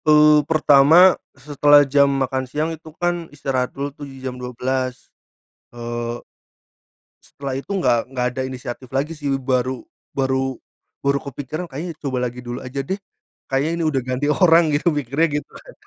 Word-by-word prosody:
Eee, 150 0 +6
pertama, 160 +4 +6 0.2
setelah 145 +1 +5
jam 140 +1 +4
makan 130 -1 -1
siang 155 +4 -1
itu 160 0 -11
kan 175 -1 -1
istirahat 135 -3 -2
dulu 140 0 -5
tuh 145 - -9
di 135 - -12
jam 130 -1 -5
12:00, 125 +1 -3 0.6
eee 120 0 -4 1.0
setelah 140 -1 -6
itu - - -27
enggak 125 -9 +3
enggak 125 -2 -2
ada 130 - -3
inisiatif 125 0 -7
lagi 140 +5 -1
sih, 145 -3 -4
baru 130 -1 -1 0.3
baru 130 -1 0 0.5
baru 140 0 +2
kepikiran, 145 +6 -5
"Kayaknya 160 +5 -5
coba 135 -3 -2
lagi 125 +1 -8
dulu 120 0 -6
aja 135 +2 -3
deh. 190 +9 -3 0.5
Kayaknya 135 +4 0
ini 170 - -1
udah 135 -4 +1
ganti 130 +3 -2
orang." 170 -2 +5
Gitu 145 +4 0
mikirnya 145 +1 +1
gitu - - -15
kan. - - -13
135 Hz, 160 wpm, -21 LUFS, 130-150 Hz, 1.0 s, Eee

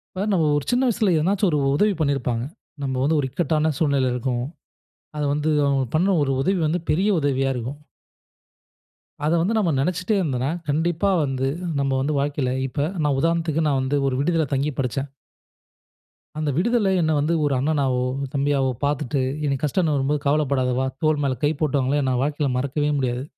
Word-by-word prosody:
இப்ப 185 - -3
நம்ம 170 -4 +2
ஒரு 145 - -3
சின்ன 245 +2 +2
வயசுல 220 -4 +1
ஏதுனாச்சு 195 +6 +1
ஒரு 150 - +1 0.2
உதவி 210 +8 +3
பண்ணியிருப்பாங்க. 125 -5 0 0.4
நம்ம 135 -1 -2
வந்து 155 +3 +2
ஒரு 140 - 0
இக்கட்டான 155 +2 0
சூழ்நிலைல 140 -5 +2
இருக்கோம். 125 0 -2 0.7
அத 150 - -2
வந்து 150 +1 0 0.2
அவுங்க 135 -1 +1
பண்ண 175 +5 +3
ஒரு 135 -1 0
உதவி 190 +3 +1
வந்து 160 +3 0
பெரிய 185 +7 +2
உதவியா 135 -2 +1
இருக்கும். 125 +4 -5 1.5
அத 155 - +2
வந்து 210 +7 0
நம்ம 190 -6 +2
நெனைச்சிட்டே 180 +8 0
இருந்தோன்னா, 135 -5 -1 0.2
கண்டிப்பா 170 +6 +1
வந்து 135 -1 -1 0.3
நம்ம 140 -1 0
வந்து 145 +3 0
வாழ்க்கையில 140 -2 -1 0.2
இப்ப 140 +2 -3 0.2
நான் 145 -2 +1
உதாரணத்துக்கு 165 -1 +1
நான் 140 -2 +1
வந்து 135 +2 0
ஒரு 130 - 0
விடுதியில 160 +2 +1
தங்கி 140 +2 0
படிச்சேன். 135 +2 -2 1.3
அந்த 155 -1 -1
விடுதில 215 +3 +2
என்ன 160 -1 +1
வந்து 150 +4 +1
ஒரு 145 - +1
அண்ணனாவோ, 135 -3 +1 0.3
தம்பியாவோ 140 -1 +1
பார்த்துட்டு, 140 -2 0 0.2
எனக்கு 140 0 -1
கஷ்டன்னு 155 +1 +1
வரும்போது 140 +1 0
"கவலப்படாத 140 -3 +1
வா!" 130 - +1 0.2
தோள் 155 -1 +2
மேல 130 -2 -1
கை 145 - +3
போட்டவங்கள 145 -1 +1
நா - - +1
வாழ்க்கையில 145 -1 -1
மறக்கவே 140 +3 -1
முடியாது. 125 -2 -1
145 Hz, 165 wpm, -23 LUFS, 135-160 Hz, 1.5 s, உதவி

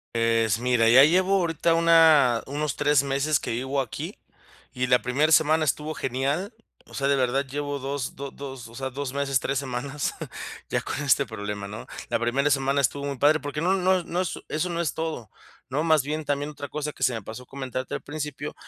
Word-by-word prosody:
Es 115 -1 +2
mira, 120 -2 +3
ya 130 +4 +8
llevo 185 +5 +4
ahorita 165 -1 +1
una 160 -7 +5
unos 145 +1 -2
3 145 -2 +3
meses 140 +2 +1
que - - -6
vivo 130 +4 -1
aquí, 120 - -6 0.6
y 125 0 -1
la 125 0 +3
primer 145 +6 +1
semana 155 0 +4
estuvo 150 +3 -1
genial. 140 - -2 0.3
O - - -18
sea, 140 - 0
de 140 - +3
verdad 135 +1 +1
llevo 145 +1 -3
dos 135 -1 -4
do 140 +1 -5
dos 135 -4 -8
o 115 - -14
sea, 135 +1 -3
2 135 0 -4
meses, 140 -2 +1
3 135 +3 -1
semanas 135 +2 -3 0.6
ya - - 0
con - - -4
este 140 0 +3
problema, 105 -3 -5
¿no? 105 +2 -8 0.2
La 115 - 0
primera 130 +5 +1
semana 140 +1 +2
estuvo 140 +2 0
muy 140 -1 -3
padre, 150 +4 +4
porque 145 0 -4
no 180 +3 +2
no 185 0 +3
es 175 - -8
no 175 - -2
es 185 - -3
eso 155 +4 -1
no 170 0 -1
es 155 - -1
todo, 160 -10 -4 0.4
¿no?, 140 +4 0
más 155 -4 +4
bien 150 +2 -3
también 145 +1 -1
otra 145 -1 -7
cosa 150 +2 -4
que - - -20
se 125 0 +3
me 115 - -4
pasó 110 +5 -9
comentarte 130 -1 -5
al - - -5
principio 150 -1 -5
140 Hz, 210 wpm, -25 LUFS, 125-150 Hz, 0.6 s, ya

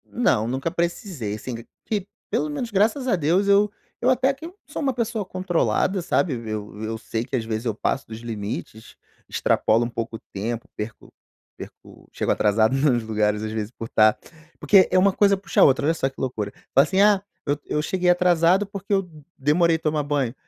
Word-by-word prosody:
Não, 115 - +1
nunca 135 +6 -2
precisei, 170 - -3
assim, 120 +3 -6
q 115 0 -9 0.2
que, 205 -3 -2 0.2
pelo 150 - 0
menos, 225 +11 -4
graças 220 +7 +1
a 235 - +3
Deus, 175 +5 +1
eu 200 +1 +4 0.3
eu 250 - +4
até 260 +1 +3
que 275 +4 -11
eu 365 +4 -14
sou - - -6
uma 275 -3 +1
pessoa 230 -2 -1
controlada, 185 +1 0
sabe, 170 -2 +1 0.2
eu 105 -1 -6
eu 110 +1 -3
sei 115 0 -4
que, 130 - -4
às 115 -3 -1
vezes, 110 +1 -3
eu 115 -3 -1
passo 135 - -2
dos 110 0 -8
limites, 110 -1 -6 0.3
extrapolo 115 +2 +2
um - - -4
pouco 115 -1 -4
o - - -20
tempo, 115 +4 -4
perco 105 +1 -7 0.5
perco - - -13
chego - - -1
atrasado 110 +4 +2
nos 135 -4 +2
lugares, 105 -1 0
às 110 - -3
vezes, 110 -1 -3
por 115 - -7
estar 110 -1 +4 0.4
porque 195 -3 +5
é 185 - +3
uma 195 +1 +4
coisa 200 0 +4
puxa 195 - 0
a - - +9
outra, 140 +1 +4
olha 160 - +3
só 135 -4 -1
que 135 - -16
loucura, 110 -6 -3 0.2
então, 135 - +6
assim, 190 +5 -1
"Ah, 205 -2 +5 0.2
eu 145 0 0
eu 150 - -1
cheguei 180 +2 0
atrasado, 180 +2 +4
porque 200 0 -9
eu 195 -2 +1 0.3
demorei 160 +4 +3
tomar 155 -1 0
banho.", 140 -5 -1
150 Hz, 200 wpm, -23 LUFS, -, 0.5 s, a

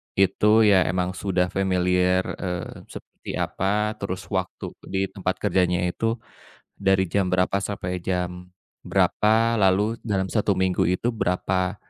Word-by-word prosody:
itu 95 +2 +3
ya 95 -4 +5
emang 90 +1 0
sudah 90 -1 -1
familiar, 90 -1 +2 0.2
eee, 90 -2 -5
seperti - - -9
apa, 105 +3 -1
terus 95 -2 -4
waktu - - -3 0.2
di 95 0 -2
tempat 95 -2 -2
kerjanya 90 -1 +2
itu 115 +3 -1 0.6
dari 95 -1 +2
jam 90 +1 0
berapa 95 +2 +1
sampai 90 -3 -4
jam 90 0 -3 0.3
berapa, 115 +1 +2
lalu 100 +4 +2
dalam 100 -4 -1
1 105 -3 +1
minggu 95 -2 +1
itu 115 +7 0
berapa, 90 0 -1
95 Hz, 130 wpm, -24 LUFS, 90-100 Hz, 0.6 s, ya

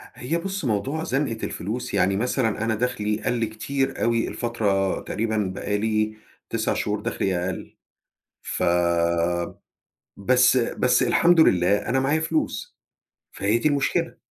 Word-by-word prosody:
هي 160 +7 -2
بُصّ، 190 -1 -4
موضوع 130 +8 -1
زنقة 135 -6 -1
الفلوس 110 +7 -4
يعني، 95 +2 +2
مثلًا 115 -2 0
أنا 110 -1 +1
دَخلي 105 -2 -1
قلَّ 120 -2 0
كتير 135 +5 -2
أوي 115 0 +1
الفترة 100 -5 0
تقريبًا 110 +1 -2 0.2
بقالي 110 +1 -1 0.3
9 - - 0
شهور - - -1
دَخلي 95 -1 -1
أقل. 90 +2 -5 0.6
فبس 85 0 0 0.9
بس، 125 +1 +2
الحمد 170 0 +4
لله، 95 - +4
أنا 135 - +2
معايا 140 +4 +1
فلوس، 160 0 -2 0.6
فهي 105 +4 +1
دي 150 - +2
المشكلة. 140 -2 0
110 Hz, 120 wpm, -24 LUFS, 100-135 Hz, 0.9 s, الحمد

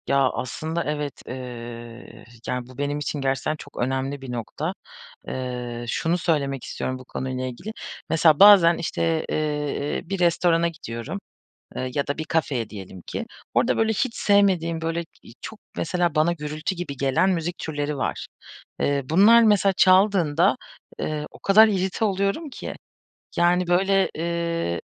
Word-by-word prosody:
Ya, 140 -1 +3
aslında 160 +6 -3
evet, 150 -1 -4
eee, 120 -2 -8 0.2
yani 125 -1 -3
bu 130 -1 -15
benim 145 +1 -1
için 150 0 -3
gerçekten 135 +3 0
çok - - -13
önemli 135 +2 -2
bir 130 -2 -7
nokta. 120 -2 -4 0.5
Eee, 125 -2 -4
şunu 165 +8 0
söylemek 140 -6 -1
istiyorum 130 0 -4
bu 130 - -12
konuyla 130 0 -4
ilgili, 130 - -6 0.4
mesela 160 -2 +4
bazen 190 -5 +8
işte, 165 -1 -1
eee, 150 -1 -1
e - - -9
bir 195 -1 -2
restorana 170 -1 +3
gidiyorum, 150 - -6 0.6
eee, 130 0 -3
ya 140 - 0
da 145 - -2
bir 155 - -2
kafeye 145 -8 -1
diyelim 95 -3 -9
ki. - - -4 0.3
Orada - - +2
böyle 225 0 +2
hiç 230 +2 -1
sevmediğim 185 -5 +2
böyle 165 +1 -2 0.2
i - - -14
çok 220 - -8 0.2
mesela 175 -1 0
bana 155 +3 +3
gürültü 155 +3 -4
gibi 170 -6 -5
gelen 135 +8 +2
müzik 175 -1 -1
türleri 145 -1 -3
var. - - -3 0.5
Eee, 140 -1 +1
bunlar 210 +8 +7
mesela 205 -3 +4
çaldığında, 185 -5 +4 0.4
eee, 150 -1 -2
o - - -15
kadar 215 +3 +6
irrite 190 +1 0
oluyorum 200 - -1
ki. - - -7 0.6
Yani 175 +1 +3
böyle, 195 +2 +3
eee, 170 - -2
155 Hz, 150 wpm, -24 LUFS, 135-180 Hz, 0.6 s, bazen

